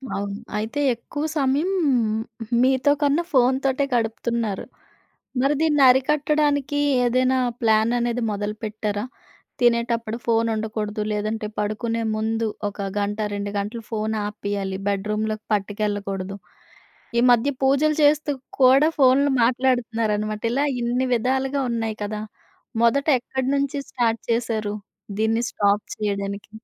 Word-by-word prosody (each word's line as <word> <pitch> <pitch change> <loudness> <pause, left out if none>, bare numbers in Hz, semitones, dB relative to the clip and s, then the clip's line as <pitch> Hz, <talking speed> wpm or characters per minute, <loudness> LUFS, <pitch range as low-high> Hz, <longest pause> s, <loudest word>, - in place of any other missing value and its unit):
అవును. 200 0 -3 0.2
అయితే 220 +6 -3
ఎక్కువ 290 +6 -5
సమయం 280 +6 +1 0.9
మీతో 260 +2 +3
కన్నా 290 +4 +2
ఫోన్‌తోటే 265 +2 +2
గడుపుతున్నారు. 230 -2 -1 0.8
మరి 275 +3 +3
దీన్ని 295 -3 +3
అరికట్టడానికి 290 +1 +2 0.3
ఏదైనా 255 +2 +2 0.2
ప్లాన్ 220 0 +3
అనేది 240 0 -1
మొదలుపెట్టారా? 210 0 -3 0.6
తినేటప్పుడు 235 -1 +1
ఫోనుండకూడదు. 220 -2 0
లేదంటే 215 +1 -2
పడుకునే 225 +2 -1
ముందు 225 +1 -1 0.2
ఒక 200 -1 -5
గంట 205 +1 -2 0.2
2 205 0 -3
గంటలు 215 +3 -4
ఫోనాపేయాలి. 205 -3 -2
బెడ్‌రూమ్‌లోకి 210 +2 -2
పట్టుకెళ్లకూడదు. 200 -1 -2 0.8
ఈ - - +6
మధ్య 245 +3 +4
పూజలు 280 +3 +3
చేస్తూ 295 +1 +3 0.3
కూడా 270 +4 +6
ఫోన్లు 275 +1 +5
మాట్లాడుతున్నారన్నమాట. 230 -4 0
ఇలా 280 +3 +1 0.2
ఇన్ని 245 +2 0
విధాలుగా 265 +4 0
ఉన్నాయి 225 -2 -2
కదా! 210 +1 -4 0.6
మొదట 280 +6 +3
ఎక్కడి 260 +1 -3
నుంచి 280 0 -1
స్టార్ట్ 230 -2 0
చేశారు 225 -3 -1 0.4
దీన్ని 225 +1 +1
స్టాప్ 205 0 +1
చేయడానికి? 200 0 -3
230 Hz, 105 wpm, -23 LUFS, 210-260 Hz, 0.9 s, ఈ